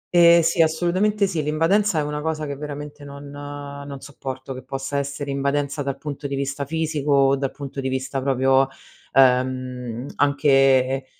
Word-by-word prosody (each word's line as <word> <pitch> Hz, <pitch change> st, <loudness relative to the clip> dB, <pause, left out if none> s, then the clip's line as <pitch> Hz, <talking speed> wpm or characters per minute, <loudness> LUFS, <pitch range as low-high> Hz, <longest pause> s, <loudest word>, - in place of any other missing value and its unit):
Ehm, 170 Hz, 0 st, +7 dB
sì 165 Hz, +1 st, +2 dB
assolutamente 180 Hz, +6 st, +2 dB
sì, 175 Hz, -5 st, -1 dB
l'invadenza 165 Hz, +6 st, +2 dB
è 150 Hz, -, +2 dB
una 150 Hz, 0 st, -3 dB
cosa 155 Hz, 0 st, -2 dB
che 140 Hz, -, -4 dB
veramente 145 Hz, 0 st, -7 dB
non 140 Hz, 0 st, -10 dB
non 145 Hz, -1 st, -8 dB
sopporto, 135 Hz, -1 st, -7 dB
che 130 Hz, -, -8 dB
possa 135 Hz, +2 st, -3 dB
essere 140 Hz, 0 st, -4 dB
invadenza 140 Hz, +1 st, -1 dB
dal 140 Hz, -1 st, -3 dB
punto 145 Hz, -1 st, -5 dB
di 140 Hz, -, -3 dB
vista 140 Hz, +1 st, -3 dB
fisico 155 Hz, -1 st, -2 dB
o 135 Hz, -1 st, +5 dB
dal 135 Hz, 0 st, -2 dB
punto 140 Hz, 0 st, -7 dB
di 130 Hz, -, -2 dB
vista 130 Hz, +1 st, -2 dB
proprio, 135 Hz, 0 st, +3 dB, 0.4 s
ehm, 125 Hz, -2 st, +1 dB
anche, 135 Hz, -2 st, +3 dB
140 Hz, 160 wpm, -23 LUFS, 135-150 Hz, 0.4 s, Ehm